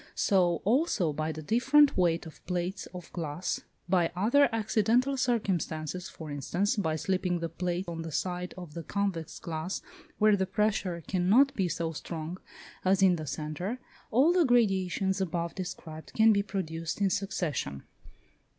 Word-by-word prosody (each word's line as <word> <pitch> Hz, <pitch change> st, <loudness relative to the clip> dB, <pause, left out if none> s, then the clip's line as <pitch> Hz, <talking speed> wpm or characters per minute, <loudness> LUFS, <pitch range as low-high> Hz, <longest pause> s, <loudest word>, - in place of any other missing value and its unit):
So, 180 Hz, -4 st, +2 dB
also, 220 Hz, -, +2 dB
by 155 Hz, +2 st, -2 dB
the 155 Hz, 0 st, -7 dB
different 270 Hz, -, +4 dB
weight 170 Hz, -2 st, +2 dB
of 160 Hz, -, -12 dB
plates 180 Hz, +2 st, -2 dB
of 180 Hz, -2 st, -10 dB
glass, 165 Hz, +1 st, -3 dB, 0.3 s
by 175 Hz, -2 st, +2 dB
other 240 Hz, +10 st, +4 dB
accidental 225 Hz, +4 st, +2 dB
circumstances, 185 Hz, -, -1 dB
for 155 Hz, -2 st, -8 dB
instance, 170 Hz, +8 st, 0 dB
by 160 Hz, -7 st, 0 dB
slipping 180 Hz, +2 st, 0 dB
the 165 Hz, -1 st, -3 dB
plate 175 Hz, +2 st, -2 dB
on 165 Hz, -1 st, -4 dB
the 165 Hz, -1 st, -6 dB
side 180 Hz, +3 st, -3 dB
of 175 Hz, -5 st, -9 dB
the 170 Hz, -, -5 dB
convex 190 Hz, -3 st, -2 dB
glass 165 Hz, +3 st, -4 dB, 0.3 s
where 215 Hz, -1 st, +5 dB
the 190 Hz, -1 st, 0 dB
pressure 195 Hz, -4 st, 0 dB
cannot 205 Hz, +10 st, +4 dB
be 190 Hz, -7 st, 0 dB
so 165 Hz, -1 st, -2 dB
strong 165 Hz, +2 st, -6 dB, 0.4 s
as 190 Hz, +1 st, +3 dB
in 180 Hz, -2 st, +5 dB
the 155 Hz, -1 st, -6 dB
centre, 155 Hz, -, -3 dB, 0.3 s
all 275 Hz, +9 st, +4 dB
the 360 Hz, -1 st, +4 dB
gradations 195 Hz, -, +2 dB
above 170 Hz, -2 st, -2 dB
described 170 Hz, -4 st, -7 dB
can 220 Hz, 0 st, +6 dB
be 200 Hz, -, +3 dB
produced 165 Hz, -5 st, -4 dB
in 195 Hz, -2 st, +2 dB
succession. 155 Hz, -, -2 dB
180 Hz, 155 wpm, -29 LUFS, 165-205 Hz, 0.4 s, can